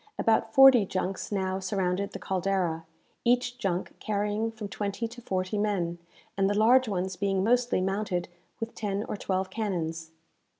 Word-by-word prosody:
About 225 -1 +2
forty 270 -4 +9
junks 185 +1 -3
now 190 -1 -1
surrounded 190 0 -1
the - - -6
"Caldera," 185 -3 -1 0.4
each 245 +1 +1
junk 185 -4 -2
carrying 210 +2 -1
from 215 -2 -7
twenty 200 +3 -3
to 240 +1 -11
forty 185 0 -2
men, 180 -5 -1 0.4
and 195 0 +2
the 205 - 0
large 245 +4 +5
ones 190 -1 -2
being 195 0 0
mostly 245 -2 +2
mounted 190 -2 -1 0.3
with 225 0 -4
ten 205 -1 -2
or - - -3
twelve 190 -1 -2
cannons. 165 -7 -3
200 Hz, 155 wpm, -28 LUFS, 185-220 Hz, 0.4 s, forty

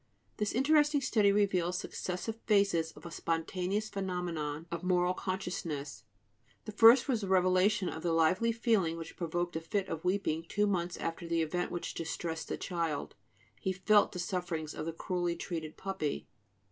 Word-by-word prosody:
This 210 -1 -1
interesting 295 +3 +4
study 215 -6 +3
reveals 185 -3 +2
successive 185 +5 -4
phases 200 -6 +3
of 150 - -15
a 170 - -7
spontaneous 180 +6 -1
phenomenon 175 -6 -3
of 170 -1 -3
moral 180 0 +2
consciousness: 170 - -4 0.6
the 215 - -5
first 230 +5 +7
was 245 -5 +1
the 200 - -3
revelation 185 +1 +3
of 160 - -4
the 170 - 0
lively 165 +8 +3
feeling 220 -8 +1
which 165 -1 -8
provoked 175 0 -2
a 160 - -2
fit 195 +3 -1
of 160 - -4
weeping 180 -3 0
two 210 0 +2
months 180 -4 -1
after 165 +1 -4
the 165 -1 +1
event 175 +3 -2
which 175 - -4
distressed 165 0 -4
the - - -3
child: 165 -5 -2 0.5
he 190 - -1
felt 205 +3 +4
the - - -7
sufferings 175 -3 -3
of 155 - -5
the - - -1
cruelly 175 +1 -2
treated 160 -4 -5
puppy. 190 -7 -3
180 Hz, 165 wpm, -32 LUFS, 165-200 Hz, 0.6 s, first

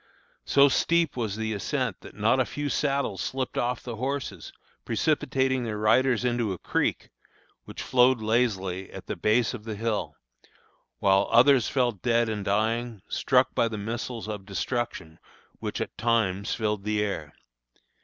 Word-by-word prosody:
So 140 0 +6
steep 170 +3 +2
was 110 -5 -2
the 110 0 -2
ascent 100 - -2
that - - -12
not - - +2
a - - +3
few 145 0 -4
saddles 140 -10 0
slipped 130 -1 -3
off 120 0 -1
the 120 -3 -6
horses, 130 - -4 0.3
precipitating 130 -1 0
their 110 -2 -3
riders 120 +3 +3
into 120 -4 0
a - - -6
creek - - -1 0.5
which - - -7
flowed 125 0 +4
lazily 105 -5 0
at - - -9
the - - -4
base 115 +3 +2
of 115 -4 -7
the 110 -1 -5
hill; 110 0 -2 0.8
while 95 0 +3
others 125 +1 +5
fell 125 -3 +2
dead 115 +2 +1
and 105 -2 -3
dying, 110 +1 -1
struck - - +2
by 115 - +2
the 110 -2 -5
missiles 115 +2 -4
of 105 -2 -5
destruction 100 -6 -3 0.4
which - - -4
at - - -4
times 110 -4 +1
filled 105 -3 -1
the 105 0 0
air. 80 -8 -4
115 Hz, 155 wpm, -27 LUFS, 105-125 Hz, 0.8 s, So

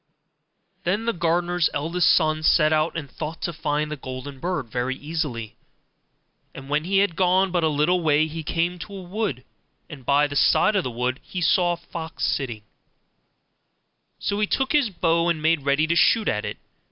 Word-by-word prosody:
Then 205 +6 0
the 235 - +1
gardener's 175 0 +1
eldest 165 +5 +1
son 155 -2 +2
set 155 0 +4
out 155 +2 +1
and 150 -4 -5
thought 155 +4 -6
to 170 - -2
find 150 0 -2
the - - -2
golden 130 0 -8
bird 170 -5 -2
very 125 +3 -2
easily; 145 -7 -4 1.0
and 135 +1 -10
when 150 +2 0
he 195 +2 +1
had 195 -4 +2
gone 185 +1 +2
but 175 -2 0
a - - +4
little 155 +4 +2
way, 155 -1 +3
he 160 +1 -6
came 170 +3 -1
to 200 +3 -8
a 195 - -7
wood, 180 - -3 0.5
and 140 -4 -10
by 140 +3 +3
the 145 -1 -5
side 215 +8 +4
of 190 - +2
the - - -3
wood 125 +2 -2
he 185 - -6
saw 175 +1 +3
a - - -5
fox 165 -1 -5
sitting; 120 -6 -2 1.5
so 200 - -2
he 210 - +1
took 270 +5 0
his 290 -6 +3
bow 170 -2 +1
and 170 -2 0
made 160 0 +2
ready 140 +2 +3
to 170 +2 0
shoot 220 +5 +4
at 105 - 0
it. - - -5
160 Hz, 190 wpm, -24 LUFS, 145-175 Hz, 1.5 s, set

